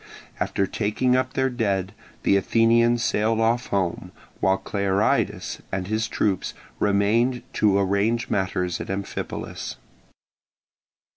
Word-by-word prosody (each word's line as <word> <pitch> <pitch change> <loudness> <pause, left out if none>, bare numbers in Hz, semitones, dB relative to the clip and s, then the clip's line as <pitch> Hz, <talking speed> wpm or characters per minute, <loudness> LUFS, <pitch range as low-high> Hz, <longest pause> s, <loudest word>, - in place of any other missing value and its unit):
After 100 - 0
taking 125 +6 0
up 130 0 0
their 130 0 +1
dead 100 -5 -1 0.3
the - - +4
Athenians 115 +3 +3
sailed 110 +2 +1
off 115 +2 +1
home, 95 -4 -1 0.3
while 95 0 +3
Clearidas 100 +1 0
and 95 -1 -2
his 110 +3 -1
troops 95 -3 -1 0.2
remained 115 +5 +2
to 100 -2 +3
arrange 100 +4 +1
matters 90 -3 -1
at - - -7
Amphipolis. 100 0 -4
105 Hz, 115 wpm, -24 LUFS, 95-115 Hz, 0.3 s, the